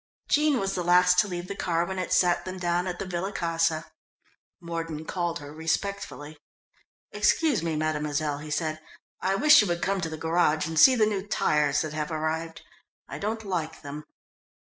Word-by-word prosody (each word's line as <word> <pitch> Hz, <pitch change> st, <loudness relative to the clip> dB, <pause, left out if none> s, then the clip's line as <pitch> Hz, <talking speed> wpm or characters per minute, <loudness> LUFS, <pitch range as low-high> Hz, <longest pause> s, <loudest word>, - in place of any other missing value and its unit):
Jean 300 Hz, -1 st, +3 dB
was 195 Hz, -2 st, -1 dB
the 180 Hz, -, -2 dB
last 180 Hz, +1 st, +5 dB
to 210 Hz, -, +3 dB
leave 175 Hz, -1 st, -5 dB
the 200 Hz, -, -4 dB
car 170 Hz, -3 st, 0 dB
when 190 Hz, +1 st, -4 dB
it 185 Hz, -, -4 dB
set 175 Hz, -1 st, +3 dB
them 185 Hz, 0 st, -6 dB
down 175 Hz, 0 st, 0 dB
at 180 Hz, -1 st, -4 dB
the 195 Hz, -, -4 dB
Villa 185 Hz, +2 st, -3 dB
Casa. 165 Hz, -3 st, 0 dB, 0.7 s
Mordon 165 Hz, -3 st, -5 dB
called 175 Hz, -1 st, -2 dB
her 145 Hz, 0 st, -10 dB
respectfully. 160 Hz, -2 st, -3 dB, 0.7 s
"Excuse 310 Hz, -, +2 dB
me, 165 Hz, -1 st, -2 dB
mademoiselle," 150 Hz, -1 st, -1 dB
he 150 Hz, +1 st, -9 dB
said, 155 Hz, +1 st, -2 dB, 0.4 s
"I 190 Hz, +1 st, +1 dB
wish 300 Hz, +5 st, +7 dB
you 210 Hz, -, 0 dB
would 175 Hz, 0 st, -2 dB
come 195 Hz, 0 st, 0 dB
to 165 Hz, -, -2 dB
the 160 Hz, -, -6 dB
garage 160 Hz, -1 st, +1 dB
and 160 Hz, 0 st, -1 dB
see 260 Hz, -, +8 dB
the 220 Hz, -3 st, +4 dB
new 205 Hz, -2 st, -2 dB
tyres 150 Hz, -7 st, +1 dB
that 155 Hz, -1 st, -4 dB
have 150 Hz, -1 st, -3 dB
arrived. 160 Hz, +1 st, -3 dB, 0.4 s
I -, -, -7 dB
don't 220 Hz, +2 st, -3 dB
like 160 Hz, -5 st, -4 dB
them." 145 Hz, +1 st, -7 dB
170 Hz, 190 wpm, -26 LUFS, 155-190 Hz, 0.7 s, see